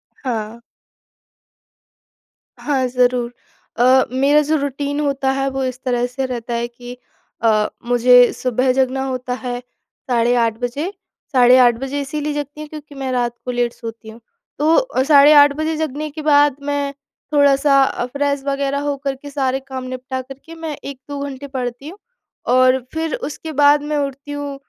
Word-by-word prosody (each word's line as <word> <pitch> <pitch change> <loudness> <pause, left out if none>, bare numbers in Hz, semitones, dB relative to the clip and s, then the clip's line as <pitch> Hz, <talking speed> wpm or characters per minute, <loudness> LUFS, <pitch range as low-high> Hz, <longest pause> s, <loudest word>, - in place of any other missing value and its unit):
हाँ। 225 -3 -4 2.0
हाँ, 270 -3 0
ज़रूर। 245 -1 +1 0.4
अ, 255 +2 +5
मेरा 280 +3 +3
जो 305 +2 0
रूटीन 285 +1 -3
होता 275 -2 0
है 270 0 -1
वो 270 0 -3
इस 255 -1 -3
तरह 245 -1 +1
से 265 +2 -3
रहता 240 -2 -5
है 235 0 -1
कि 245 +1 -11 0.5
अ, 215 -2 +3 0.2
मुझे 245 0 +5
सुबह 255 +1 0
जगना 265 0 0
होता 255 -1 -3
है 245 -1 -3 0.5
साढ़े 240 0 +2
8 225 -1 +1
बजे, 250 +7 -3 0.4
साढ़े 250 -1 +6
8 240 -1 +4
बजे 270 +2 -3
इसीलिए 295 +2 -3
जगती 290 +1 -5
हूँ 305 - -7
क्योंकि 300 -2 -10
मैं 270 -1 -4
रात 245 -1 0
को 250 - -2
लेट 240 -1 -1
सोती 225 -1 -9
हूँ, 220 +1 -12 0.4
तो 320 - +2
साढ़े 290 0 +7
8 285 0 +4
बजे 315 +1 -1
जगने 305 -1 -3
के 310 - -7
बाद 290 -2 +5
मैं 285 -1 -1 0.4
थोड़ा-सा 280 -1 +4
अ, 245 - -1
फ्रेश 280 +1 -2
वगैरह 280 0 -1
होकर 275 -1 -3
के 285 +2 -11
सारे 270 -2 -1
काम 260 -1 -5
निपटा 255 +1 -5
करके 270 +6 -12
मैं 320 -2 -5
1-2 280 +1 -7
घंटे 280 0 -7
पढ़ती 255 +1 -5
हूँ 380 - -11 0.6
और 255 0 +5
फिर 320 -2 -2
उसके 305 +3 -6
बाद 290 0 +5
मैं 300 - +1
उठती 275 +2 -10
हूँ 285 -1 -5
270 Hz, 165 wpm, -19 LUFS, 250-285 Hz, 2.0 s, साढ़े